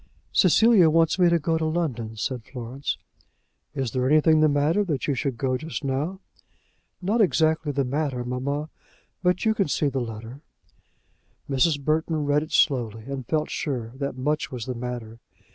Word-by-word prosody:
"Cecilia 195 -1 +5
wants 165 +3 +3
me 175 -1 +6
to 170 - +4
go 165 +1 0
to 160 - -1
London," 130 -10 -2
said 125 +2 -3
Florence. 125 +3 -5 0.8
"Is 135 -5 -2
there 130 +1 0
anything 155 +1 +5
the 155 - +5
matter 145 +8 +2
that 155 -9 -2
you 145 - +2
should 135 -2 -2
go 130 +1 0
just 160 0 -5
now?" 145 +8 -2 0.8
"Not 215 +5 +2
exactly 160 -5 +2
the 140 -1 0
matter, 135 -1 -2
mamma; 140 +5 -3 0.5
but 180 +2 +1
you 220 - +4
can 205 -5 0
see 145 0 +1
the 135 -1 -2
letter." 115 +3 -7 1.1
Mrs. 145 +2 +2
Burton 155 +1 0
read 145 +1 +2
it 155 - -7
slowly, 115 -6 +1
and 135 -1 -6
felt 155 -1 -1
sure 120 -6 -3
that 140 -1 -4
much 150 +4 -1
was 120 -3 -5
the 130 - -3
matter. 120 -2 -6
145 Hz, 170 wpm, -25 LUFS, 125-160 Hz, 1.1 s, me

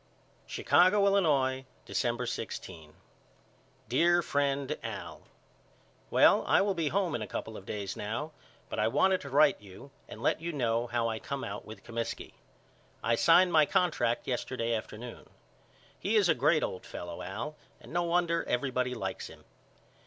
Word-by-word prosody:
Chicago, 195 +3 +4
Illinois, 140 -10 +2 0.2
December 120 0 -1
16. 85 -9 -6 0.9
DEAR 170 +8 +3
FRIEND 140 0 0
AL: - - -6 0.9
Well - - +5
I - - +5
will 200 0 +2
be 165 -4 -1
home 185 +2 0
in 120 - -2
a 105 - -4
couple 110 +3 -5
of 100 - -10
days 100 -2 -4
now 115 +9 -4 0.4
but - - -4
I 105 - +3
wanted 185 +10 +3
to 140 - -8
write 145 -1 +4
you 100 +7 -13 0.2
and - - -9
let - - +1
you 170 +1 -3
know 120 -3 0
how 120 -1 0
I 110 -1 -2
come 140 +3 -5
out 100 +1 -6
with 110 - -11
Comiskey. 115 -1 -5 0.7
I 115 - +2
signed 175 +8 +5
my 155 -2 +6
contract 120 -10 +1
yesterday 125 -2 -2
afternoon. 115 +2 -6 0.7
He 205 +4 0
is 205 -4 +5
a 165 - +5
great 160 0 +2
old 90 - -4
fellow 85 -1 -7
Al 150 +10 -5 0.2
and - - -13
no 175 - +2
wonder 170 -1 +1
everybody 125 0 0
likes 95 -4 -4
him. - - -14
130 Hz, 160 wpm, -30 LUFS, 115-170 Hz, 0.9 s, my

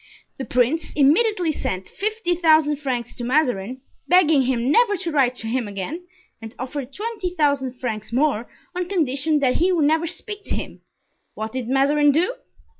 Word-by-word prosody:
"The 265 - -3
prince 250 +7 +1
immediately 340 +5 +3
sent 185 -10 -4
fifty 430 -3 -2
thousand 315 -3 +3
francs 245 -4 -4
to 240 - -5
Mazarin, 250 -3 0 0.3
begging 320 -6 +5
him 255 0 0
never 440 +1 +4
to 345 -2 -3
write 265 -4 +2
to 225 - -6
him 240 0 -1
again, 205 - -6 0.3
and 225 +1 -9
offered 260 +1 -5
twenty 415 - -4
thousand 280 -5 +1
francs 220 -4 -4
more, 250 -2 0 0.3
on 360 -1 -3
condition 305 -4 +1
that 255 -2 +2
he 360 +3 +2
would 330 -5 +2
never 320 +3 +2
speak 410 +5 -6
to - - -2
him. - - -7 0.5
What 220 +1 -4
did 250 -1 -4
Mazarin 285 +2 +3
do?" 350 - +1
290 Hz, 170 wpm, -22 LUFS, 250-345 Hz, 0.5 s, begging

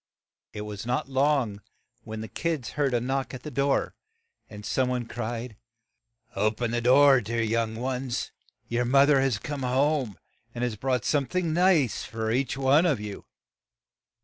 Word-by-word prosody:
It 105 - -6
was 105 -1 -6
not 125 +2 -1
long 135 -6 +1 0.4
when 110 -1 -6
the 110 - -6
kids 160 -4 -3
heard 145 -2 0
a - - +3
knock 130 +2 -2
at 125 - -10
the 150 - -6
door, 140 +1 +1 0.6
and 105 -3 -10
some 130 -1 +1
one 125 -1 -1
cried, 115 -1 -5 0.8
"O 110 - +3
pen 115 +2 -3
the 120 0 0
door, 135 +2 +6
dear 115 +2 -2
young 110 0 0
ones; 125 +1 -3 0.4
your 120 +1 0
moth 135 +4 +4
er 140 -2 +5
has 135 -5 +1
come 145 +6 -5
home, 130 - +1 0.4
and 120 - -3
has 120 -3 -1
brought 125 +2 -1
some 140 -3 +1
thing 180 -3 -1
nice 170 - +3
for 110 0 -3
each 130 +2 0
one 140 +6 +4
of 145 -9 +1
you." 105 -1 -7
125 Hz, 175 wpm, -27 LUFS, 115-140 Hz, 0.8 s, door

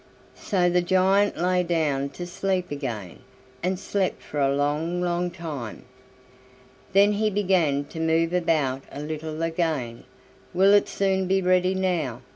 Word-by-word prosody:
So 180 -3 +1
the 175 0 +3
giant 190 +3 +2
lay 180 +2 +2
down 155 -6 0
to 175 - -4
sleep 180 0 -2
again, 115 - -5 0.4
and 185 +1 -1
slept 195 0 -2
for 150 - -5
a 135 -1 +3
long, 150 +5 -1
long 175 0 0
time. 155 - -7 1.1
Then 200 +2 +5
he 215 +1 +1
began 180 -8 +1
to 160 - -9
move 165 +1 +1
about 155 -7 +1
a - - -7
little 155 +1 -5
again. 160 -8 -2 0.5
"Will 195 +2 +5
it 205 - +4
soon 190 -1 0
be 190 +1 +2
ready 185 0 +2
now?" 165 -10 -1
175 Hz, 145 wpm, -25 LUFS, 150-185 Hz, 1.1 s, Then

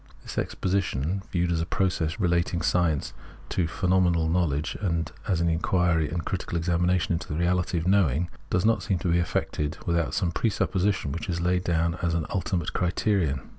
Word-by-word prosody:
This - - -4
exposition, 95 -2 -1
viewed 85 -1 +1
as 80 -1 +1
a - - -1
process 90 -5 0
of - - -6
relating 85 -1 +1
science 85 -6 +1 0.4
to 85 - 0
phenomenal 90 -2 +2
know 90 +2 +2
ledge, 75 0 -2
and 85 -5 -1 0.2
as 85 -3 +1
an 85 - +2
inquiry 85 -1 +2
and 85 -2 -3
critical 85 - -2
examination 90 0 +1
into 85 - -3
the 75 - -3
reality 90 0 +1
of 80 - -2
knowing, 90 -5 +3 0.2
does 90 +2 +1
not 110 -3 +3
seem 95 - 0
able 85 - -5
to 90 - +1
be 85 - +3
effected 75 -3 -1
without 85 -2 0
some 85 - +1
presupposition 95 -5 0
which 85 - -5
is 85 -1 -1
laid 90 +1 +1
down 85 0 0
as 85 -1 0
•in 80 -3 0
ultimate 95 -3 -1
criterion. 90 -6 +1
85 Hz, 190 wpm, -26 LUFS, 80-90 Hz, 0.4 s, knowing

